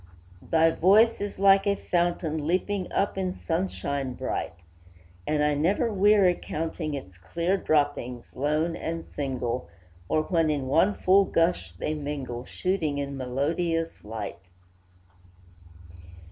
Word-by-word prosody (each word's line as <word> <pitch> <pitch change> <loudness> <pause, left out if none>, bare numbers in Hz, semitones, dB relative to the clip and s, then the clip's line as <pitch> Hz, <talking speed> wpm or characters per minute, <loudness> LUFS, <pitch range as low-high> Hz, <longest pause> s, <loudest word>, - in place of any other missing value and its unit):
Thy 165 - +3
voice 210 +8 +4
is 205 0 -4
like 195 +1 +5
a 200 - +3
fountain 170 -5 -1
Leaping 185 +2 -1
up 195 -1 0
in 185 -1 -2
sunshine 140 -6 -2
bright, 80 - -3 0.7
And 150 -1 +1
I 150 0 +2
never 190 +10 +1
weary 200 -2 +5
counting 160 -1 -3
Its 95 -10 -9
clear 170 - -1
droppings, 145 -8 -1
lone 150 +5 0
and 165 0 -4
single, 125 -3 -3 0.4
Or 155 - +2
when 165 -2 +1
in 145 -3 -1
one 165 +10 +3
full 195 +2 +4
gush 165 0 0
they 155 - -3
mingle, 140 -5 -5
Shooting 165 -5 -1
in 140 -1 -3
melodious 165 +6 -2
light. 110 -5 -6
160 Hz, 125 wpm, -26 LUFS, 140-185 Hz, 0.7 s, like